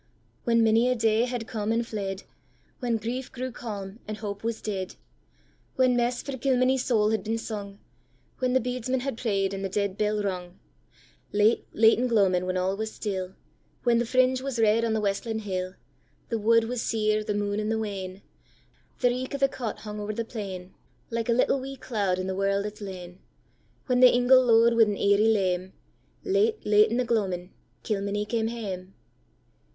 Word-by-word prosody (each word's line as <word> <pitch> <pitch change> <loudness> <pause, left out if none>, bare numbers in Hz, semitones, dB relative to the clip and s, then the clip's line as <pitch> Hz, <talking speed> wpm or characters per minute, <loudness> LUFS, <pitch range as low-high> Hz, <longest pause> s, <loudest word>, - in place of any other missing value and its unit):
When 230 -1 +4
many 225 +2 +4
a 255 - +2
day 225 0 +2
had 245 -2 -4
come 215 -1 -2
and 230 +1 +1
fled, 195 -3 -4 0.6
When 240 -3 0
grief 240 +4 -4
grew 255 0 -4
calm, 205 -3 -7
and 215 0 -4
hope 205 -1 -6
was 230 0 -2
dead, 190 -3 -4 0.8
When 255 -1 +3
mess 245 +1 0
for 275 - -4
Kilmeny's 255 0 +2
soul 215 -4 +2
had 220 -3 0
been 225 +1 -1
sung, 205 -3 -6 0.6
When 255 -1 +1
the 260 - +5
bedesman 250 +1 -2
had 275 -2 -3
pray'd 200 -4 0
and 195 0 -4
the 195 - -2
dead 200 0 -2
bell 210 0 +1
rung, 180 -3 -4 0.7
Late, 210 +2 +3
late 225 +1 +5
in 250 - +1
gloamin' 190 -6 +2
when 185 0 0
all 185 +1 0
was 220 +1 -4
still, 190 -3 -4 0.5
When 235 -1 +3
the 240 - +1
fringe 255 +1 +3
was 270 -2 -3
red 225 0 +3
on 230 -1 +1
the 220 - 0
westlin 210 +2 -1
hill, 185 -2 -3 0.5
The 230 -2 -1
wood 230 +2 +4
was 240 +1 -3
sere, 215 -1 +1
the 210 -1 -2
moon 205 0 -1
i' - - -1
the 225 - +1
wane, 195 -3 -5 0.8
The 245 - +5
reek 255 +3 -3
o' - - -1
the 275 0 +3
cot 245 -4 -5
hung 210 -1 -6
over 210 +1 -3
the 230 0 -2
plain, 190 -5 -7 0.4
Like 230 0 -2
a - - +5
little 255 +3 +2
wee 270 +1 -6
cloud 205 -8 -1
in 185 - -3
the 190 - -2
world 195 +1 0
its 210 0 -7
lane; 180 -2 -8 0.7
When 250 -2 +2
the 255 0 +8
ingle 250 +1 +5
low'd 230 -1 +5
wi' 230 - +4
an 210 -2 +3
eiry 200 +2 +3
leme, 185 -3 0 0.5
Late, 420 +3 +1
late 210 0 +5
in 235 - -1
the 250 - +1
gloamin' 190 -6 -1 0.3
Kilmeny 205 0 -1
came 225 0 -1
hame! 195 -5 -6
220 Hz, 190 wpm, -27 LUFS, 200-240 Hz, 0.8 s, the